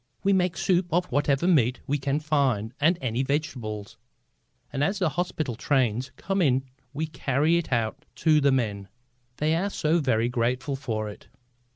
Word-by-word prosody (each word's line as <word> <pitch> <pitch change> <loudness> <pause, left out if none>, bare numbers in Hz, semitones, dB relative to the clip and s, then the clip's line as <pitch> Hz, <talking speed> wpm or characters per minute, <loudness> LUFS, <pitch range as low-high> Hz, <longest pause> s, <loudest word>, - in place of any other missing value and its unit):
We 200 0 +3
make 180 -3 +1
soup 180 -1 +2
of 175 +2 +2
whatever 145 +3 +1
meat 125 -8 +3
we 145 +2 0
can 140 +2 0
find 135 -8 0
and 165 +4 +4
any 125 -1 -1
vegetables, 130 -8 -3 0.8
and 140 0 0
as 195 +7 +1
the 180 -4 +1
hospital 155 -4 -2
trains 125 0 0
come 195 0 -1
in 135 -5 +3 0.3
we 150 +3 -2
carry 150 +1 +1
it 170 - -6
out 115 -3 -1
to 155 +5 +3
the 140 0 +4
men. 105 -7 -1 0.5
They 155 +2 +1
are 190 +5 0
so 165 -3 +1
very 120 -6 +1
grateful 125 +3 -1
for 110 -5 -3
it." 105 - -10
140 Hz, 170 wpm, -26 LUFS, 120-160 Hz, 0.8 s, and